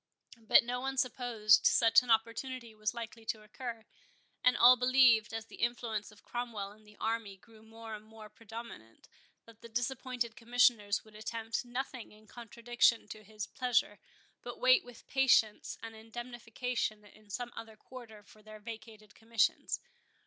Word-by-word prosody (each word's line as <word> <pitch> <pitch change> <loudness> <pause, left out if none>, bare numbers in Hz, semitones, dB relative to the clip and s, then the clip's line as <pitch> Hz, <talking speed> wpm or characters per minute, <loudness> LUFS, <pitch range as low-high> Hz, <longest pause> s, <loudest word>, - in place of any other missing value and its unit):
But 220 +1 +5
no 245 +1 -3
one 270 +1 -3
supposed 245 -5 +3
such 230 +1 +6
an 250 - -11
opportunity 230 +1 0
was 215 +1 -3
likely 230 -1 -7
to 215 -1 -3
occur; 230 +1 -7 0.6
and 250 0 +4
all 250 +1 +9
believed, 250 -3 +4
as 225 0 -5
the - - -14
influence 230 -3 -2
of 210 - -19
Cromwell 230 -5 -4
and 215 +1 -19
the 210 - -18
army 225 -3 -2
grew 220 +3 -19
more 225 0 -10
and 210 0 -8
more 220 0 -13
predominant, 225 - -11 0.4
that 230 -1 -17
the 235 - -11
disappointed 245 0 -2
Commissioners 235 -4 +2
would 215 - -18
attempt 225 +1 -4
nothing 250 0 -5
in 215 +1 -18
contradiction 235 0 0
to 215 +1 -9
his 210 0 -6
pleasure, 245 -5 0 0.4
but - - -8
wait - - +5
with 245 -1 -14
patience 255 -5 +2
an 225 0 -7
indemnification 230 -1 -4
in 210 0 -19
some 240 +4 -5
other 220 -1 -9
quarter 220 -2 -12
for 215 +1 -19
their 215 0 -12
vacated 220 -1 -10
commissions. 225 -1 0
225 Hz, 155 wpm, -32 LUFS, 215-245 Hz, 0.6 s, all